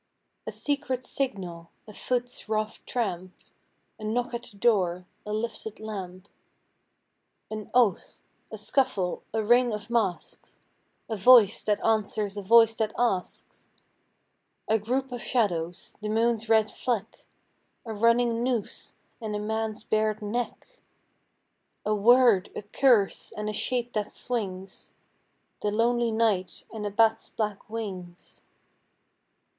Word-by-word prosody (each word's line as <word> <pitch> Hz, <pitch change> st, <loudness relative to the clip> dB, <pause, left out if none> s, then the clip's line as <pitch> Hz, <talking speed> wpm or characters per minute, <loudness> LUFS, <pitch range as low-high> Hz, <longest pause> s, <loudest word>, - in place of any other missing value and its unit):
A -, -, -2 dB
secret 260 Hz, -3 st, -1 dB
signal; 180 Hz, -10 st, -3 dB, 0.2 s
a 215 Hz, -, -11 dB
foot's 245 Hz, +1 st, -3 dB
rough 215 Hz, 0 st, -2 dB
tramp; 185 Hz, -6 st, -2 dB, 0.7 s
A -, -, -10 dB
knock 240 Hz, +3 st, -1 dB
at 235 Hz, -, -3 dB
the 225 Hz, -4 st, -13 dB
door; 185 Hz, -6 st, +2 dB, 0.2 s
a -, -, -3 dB
lifted 220 Hz, 0 st, -4 dB
lamp. 195 Hz, -3 st, -7 dB, 1.2 s
An 215 Hz, -1 st, -6 dB
oath; 235 Hz, -7 st, +2 dB, 0.3 s
a 220 Hz, -, -6 dB
scuffle; 210 Hz, -4 st, 0 dB
a 220 Hz, 0 st, -1 dB
ring 240 Hz, +2 st, +4 dB
of 210 Hz, +2 st, -6 dB
masks; 210 Hz, -7 st, -2 dB, 0.5 s
A 225 Hz, -, -3 dB
voice 215 Hz, 0 st, +6 dB
that 210 Hz, -1 st, 0 dB
answers 215 Hz, -2 st, +1 dB
a 205 Hz, -, -4 dB
voice 225 Hz, +2 st, +6 dB
that 215 Hz, -1 st, -1 dB
asks. 210 Hz, -7 st, -2 dB, 1.0 s
A 220 Hz, +1 st, +3 dB
group 255 Hz, +5 st, -2 dB
of 245 Hz, -1 st, -5 dB
shadows; 175 Hz, -8 st, -1 dB
the 210 Hz, -, -3 dB
moon's 225 Hz, 0 st, +1 dB
red 220 Hz, -2 st, +4 dB
fleck; 230 Hz, -4 st, -3 dB, 0.6 s
A 225 Hz, -, -5 dB
running 230 Hz, +2 st, +2 dB
noose 245 Hz, -5 st, -3 dB, 0.3 s
and 215 Hz, -2 st, -3 dB
a -, -, -2 dB
man's 220 Hz, 0 st, -3 dB
bared 215 Hz, -1 st, 0 dB
neck. 240 Hz, -, -5 dB, 1.1 s
A 215 Hz, -, +1 dB
word, 230 Hz, -2 st, +5 dB
a -, -, -5 dB
curse, 215 Hz, -1 st, +2 dB
and 210 Hz, 0 st, -4 dB
a -, -, -3 dB
shape 245 Hz, +3 st, -1 dB
that 210 Hz, -1 st, -2 dB
swings; 195 Hz, -6 st, -4 dB, 0.7 s
The 210 Hz, -, 0 dB
lonely 235 Hz, +2 st, +1 dB
night 220 Hz, -5 st, 0 dB
and 210 Hz, -2 st, -4 dB
a -, -, -2 dB
bat's 225 Hz, +2 st, +2 dB
black 210 Hz, -1 st, -4 dB
wings.... 185 Hz, -6 st, -7 dB
220 Hz, 130 wpm, -27 LUFS, 205-235 Hz, 1.2 s, voice